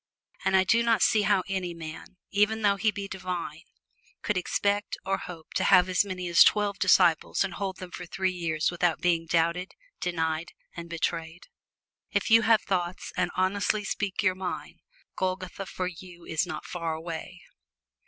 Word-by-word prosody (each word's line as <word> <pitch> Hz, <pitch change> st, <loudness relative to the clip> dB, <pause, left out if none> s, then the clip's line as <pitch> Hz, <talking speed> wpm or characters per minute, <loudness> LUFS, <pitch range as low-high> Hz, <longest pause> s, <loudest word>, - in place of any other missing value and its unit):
And -, -, +2 dB
I 190 Hz, -, +5 dB
do 230 Hz, +5 st, +3 dB
not 230 Hz, -3 st, +3 dB
see 215 Hz, -, +4 dB
how 205 Hz, -2 st, +2 dB
any 185 Hz, -3 st, -3 dB
man, 160 Hz, +2 st, -9 dB
even 210 Hz, +2 st, +2 dB
though 200 Hz, -1 st, +3 dB
he 215 Hz, +3 st, +2 dB
be 200 Hz, -1 st, -4 dB
divine, 180 Hz, -5 st, -5 dB, 0.6 s
could 210 Hz, -, 0 dB
expect 200 Hz, +3 st, 0 dB
or 195 Hz, 0 st, 0 dB
hope 165 Hz, -3 st, -10 dB
to -, -, +1 dB
have 180 Hz, -1 st, +6 dB
as 185 Hz, +1 st, +3 dB
many 185 Hz, -3 st, -5 dB
as 170 Hz, -1 st, +8 dB
twelve 205 Hz, -1 st, +2 dB
disciples 170 Hz, -1 st, +4 dB
and 190 Hz, -2 st, -4 dB
hold 190 Hz, -1 st, -4 dB
them 185 Hz, -1 st, -9 dB
for 180 Hz, -, -7 dB
three 190 Hz, +2 st, -1 dB
years 165 Hz, -3 st, -1 dB
without 175 Hz, -1 st, +1 dB
being 165 Hz, -2 st, +1 dB
doubted, 170 Hz, +2 st, 0 dB, 0.3 s
denied 160 Hz, -1 st, -2 dB, 0.2 s
and 170 Hz, 0 st, -7 dB
betrayed. 165 Hz, 0 st, -3 dB, 0.7 s
If -, -, -1 dB
you 225 Hz, 0 st, +8 dB
have 225 Hz, -1 st, +4 dB
thoughts, 180 Hz, -2 st, -2 dB
and 175 Hz, -, +1 dB
honestly 200 Hz, +3 st, +1 dB
speak 200 Hz, 0 st, -2 dB
your 185 Hz, -2 st, +3 dB
mind, 185 Hz, -1 st, -6 dB, 0.4 s
Golgotha 185 Hz, +1 st, -3 dB
for 185 Hz, -, -3 dB
you 175 Hz, -1 st, -9 dB
is 160 Hz, +3 st, -1 dB
not -, -, -6 dB
far 165 Hz, -2 st, -3 dB
away. 160 Hz, 0 st, -7 dB
185 Hz, 175 wpm, -27 LUFS, 170-200 Hz, 0.7 s, as